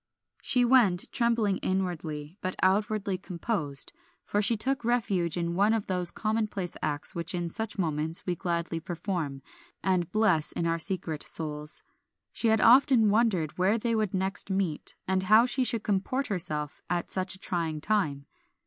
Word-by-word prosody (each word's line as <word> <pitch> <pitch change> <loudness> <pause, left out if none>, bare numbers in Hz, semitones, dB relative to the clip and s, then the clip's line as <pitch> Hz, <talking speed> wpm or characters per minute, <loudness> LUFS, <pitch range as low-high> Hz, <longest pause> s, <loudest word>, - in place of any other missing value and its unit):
She 250 -1 +3
went, 230 -8 +4
trembling 230 -5 +1
inwardly, 170 -4 -3
but 185 - -3
outwardly 200 0 +1
composed, 170 - -3 0.3
for 205 - 0
she 215 +2 +4
took 265 +3 0
refuge 200 -8 +1
in 170 0 -1
one 205 +5 +3
of 220 - -2
those 180 -2 0
commonplace 215 -5 -2
acts 145 -1 -1
which 170 +1 -3
in 175 -1 -2
such 220 +4 -4
moments 160 -2 -1
we 180 - -1
gladly 170 -2 -2
perform, 165 -5 -4 0.4
and 180 -3 +1
bless 190 -8 +2
in 170 - -2
our 165 0 0
secret 165 -4 -3
souls. 150 -1 -4 0.5
She 235 - 0
had 220 -1 +4
often 245 -3 +6
wondered 200 -9 +1
where 195 +5 +3
they 230 +1 -1
would 215 -3 0
next 190 +1 -1
meet, 190 -6 -2
and 190 0 +1
how 215 +5 +6
she 255 +1 +1
should 230 -3 +1
comport 215 +7 -1
herself 155 -6 -3
at 175 -1 -2
such 190 0 0
a - - -15
trying 165 -5 -2
time. 150 -7 0
190 Hz, 160 wpm, -28 LUFS, 170-215 Hz, 0.5 s, often